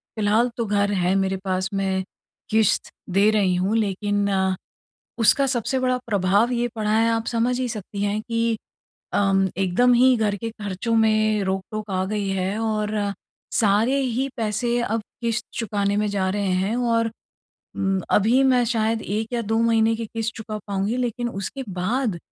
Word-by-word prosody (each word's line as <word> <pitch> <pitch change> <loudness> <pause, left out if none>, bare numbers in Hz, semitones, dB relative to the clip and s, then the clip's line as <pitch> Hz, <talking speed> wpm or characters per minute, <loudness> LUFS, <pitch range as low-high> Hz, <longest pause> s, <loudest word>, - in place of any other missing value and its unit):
फ़िलहाल 220 +3 +2
तो 235 - -1
घर 205 0 +1
है 185 -2 +1
मेरे 190 0 0
पास, 185 0 -1
मैं 190 -1 0 0.5
किश्त 220 -2 +2 0.2
दे 200 +3 +4
रही 195 -4 +2
हूँ, 190 +4 0
लेकिन 205 -1 0 0.9
उसका 275 +5 +6
सबसे 255 0 0
बड़ा 255 0 +1
प्रभाव 205 +3 +2
ये 240 0 0
पड़ा 215 -1 -1
है, 225 +1 +3
आप 225 0 0
समझ 240 +1 0
ही 255 - -1
सकती 205 -2 -6
हैं 205 +1 0
कि 230 0 -1 0.6
अम, 195 -1 +3
एकदम 195 +7 +3
ही 255 +1 +5
घर 210 -2 +1
के 225 +3 -5
खर्चों 210 +1 -4
में 215 -2 +3
रोक-टोक 195 +3 -4
आ 185 0 0
गई 205 0 -2
है 195 +1 -1
और 215 -1 -1 0.7
सारे 220 +5 +3
ही 260 +1 -1
पैसे 235 +2 0
अब 225 -1 -1 0.2
किश्त 230 0 -1
चुकाने 205 -3 -1
में 210 0 +1
जा 195 -2 0
रहे 200 0 -1
हैं 205 +4 -1
और 230 -2 +1 0.6
उम, 195 -1 0
अभी 225 +6 +4
मैं 255 -2 +4
शायद 225 -1 0
1 215 +2 -2
या 235 - 0
2 225 0 -1
महीने 225 -1 +3
की 230 0 -4
किश्त 225 +1 -3
चुका 220 -1 -6
पाऊँगी, 200 +4 -1
लेकिन 240 -1 -2
उसके 200 +7 -4
बाद 195 +3 -1
215 Hz, 170 wpm, -23 LUFS, 200-230 Hz, 0.9 s, उसका